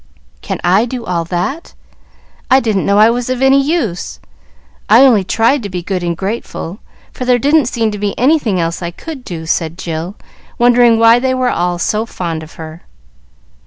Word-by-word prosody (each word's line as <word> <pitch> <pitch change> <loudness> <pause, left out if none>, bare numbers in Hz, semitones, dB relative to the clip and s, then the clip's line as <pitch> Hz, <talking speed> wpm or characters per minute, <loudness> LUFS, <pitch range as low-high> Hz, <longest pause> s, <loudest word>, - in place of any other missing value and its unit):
"Can - - -4
I 190 +6 +3
do 245 -1 -6
all 170 -4 -1
that? 185 - -4 0.7
I 260 0 +6
didn't 220 -6 -1
know 200 0 +3
I 215 +2 +6
was 245 +1 -3
of 255 -1 -1
any 270 +1 +4
use. 270 - -2 0.7
I 225 +4 +7
only 225 -7 +4
tried 230 +8 +1
to 205 - -6
be 180 -2 -5
good 185 0 -3
and 170 -1 -2
grateful, 195 -2 -5 0.3
for - - -6
there 250 0 +3
didn't 285 +1 +2
seem 230 -3 -1
to 210 - -6
be 205 -1 -3
anything 250 - +2
else 165 +1 -2
I 170 - -3
could 275 - -9
do," 165 -7 -7
said 165 0 -2
Jill, 170 +1 -5 0.4
wondering 240 -1 +4
why 230 +1 +5
they 260 +1 0
were 255 -1 0
all 175 0 -1
so 215 +5 -1
fond 170 -6 -4
of 160 0 -12
her. 160 +1 -9
215 Hz, 190 wpm, -14 LUFS, 175-250 Hz, 0.7 s, I